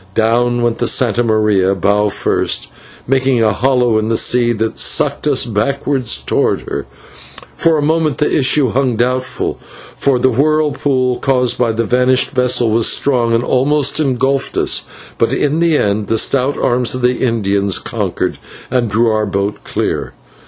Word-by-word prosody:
Down 120 +2 +1
went 120 -1 -1
the 120 - 0
/Santa 120 -2 +1
Maria/, 105 -4 +1
bow 100 +3 +1
first, - - -1 0.4
making 130 -2 +1
a 110 -2 +2
hollow 125 0 +1
in 110 +1 -2
the 115 - +1
sea 120 0 +2
that 110 0 -3
sucked - - +1
us - - +1
back 120 +5 -2
towards 130 -5 0
her. - - -5 0.7
For 165 -1 +1
a 145 - -1
moment 155 -1 0
the 150 - 0
issue 135 -1 +2
hung 130 0 0
doubtful, 130 +2 -2 0.4
for 140 -2 +1
the 130 +1 +2
whirlpool 140 -2 0
caused 125 -3 0
by 120 -2 +2
the 115 +1 -1
vanished 125 +3 +1
vessel 125 -3 +2
was 115 0 +3
strong 125 -4 0
and 115 - 0
almost 140 +3 +1
engulfed 135 -1 -1
us, - - +1 0.3
but - - +1
in 145 +2 0
the 170 -2 +2
end 100 -2 -1
the 115 - 0
stout 135 +4 0
arms 125 0 0
of 130 - -5
the 125 +1 0
Indians 100 -5 0
conquered - - -3 0.3
and 120 -3 0
drew 110 +3 +2
our 110 -1 0
boat 100 +1 -2
clear. - - -3
125 Hz, 165 wpm, -15 LUFS, 110-135 Hz, 0.7 s, was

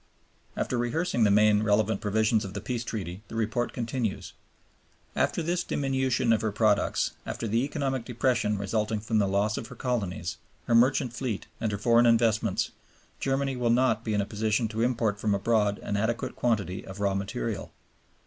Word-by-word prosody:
After 125 - -1
rehearsing 120 0 +1
the - - +4
main 105 +1 +5
relevant 110 0 +2
provisions 110 +1 +2
of 100 0 -7
the - - -2
Peace 120 +3 -3
Treaty 95 -5 -5
the - - -9
report 115 +2 -1
continues: 115 -3 -3 0.8
"After 170 - +1
this 175 +2 0
diminution 130 -5 +1
of 110 - +1
her 110 - 0
products, 105 0 +2
after 115 - -4
the 115 +3 +1
economic 135 -3 -2
depression 120 -3 0
resulting 105 +2 -1
from 110 +1 0
the 100 - +2
loss 100 +2 +1
of 115 - -7
her 125 - -11
colonies, 100 -9 -2 0.3
her 120 - 0
merchant 125 +1 +4
fleet 120 -4 -3
and 110 - -1
her 100 - -2
foreign 120 +3 +4
investments, 115 -3 +2 0.5
Germany 135 0 0
will 120 -1 0
not 120 -2 +3
be 110 -2 -1
in 105 - +2
a - - -2
position 110 +2 0
to 110 +1 -3
import 115 -4 +1
from 105 -1 +1
abroad 105 0 +1
an 105 - -2
adequate 115 +5 -1
quantity 100 -7 -1
of 95 +1 -9
raw 100 -1 +1
material. 95 -11 -3
110 Hz, 175 wpm, -28 LUFS, 105-120 Hz, 0.8 s, main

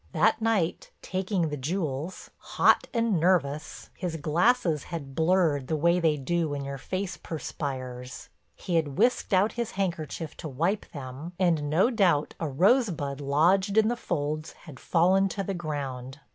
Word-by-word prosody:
That 215 +7 +3
night, 220 -7 0
taking 185 -3 -1
the 150 - -4
jewels, 155 +2 -3
hot - - +3
and 230 -6 +1
nervous, 155 -4 0
his 175 -3 -4
glasses 165 - +1
had 145 -6 -6
blurred 160 -4 +2
the 160 - 0
way 170 +3 +3
they 160 -3 +2
do 165 +3 -1
when 140 -1 -4
your 140 0 -5
face 185 +6 -4
perspires. 130 -5 -6 0.3
He 175 -2 -1
had 145 -3 -1
whisked 240 +3 +2
out 195 +3 +4
his 235 -2 -4
handkerchief 165 -4 -3
to - - -6
wipe 170 +10 -1
them, 140 +4 -7
and 165 -6 +1
no 180 - +3
doubt 180 - +2
a 160 - -2
rosebud 170 - +2
lodged 180 +9 +2
in 220 0 +5
the 240 - 0
folds 155 -6 -3
had 150 -6 -11
fallen 190 +3 +3
to 195 +1 -3
the 195 - -3
ground. 140 -6 -5
165 Hz, 160 wpm, -27 LUFS, 145-190 Hz, 0.3 s, in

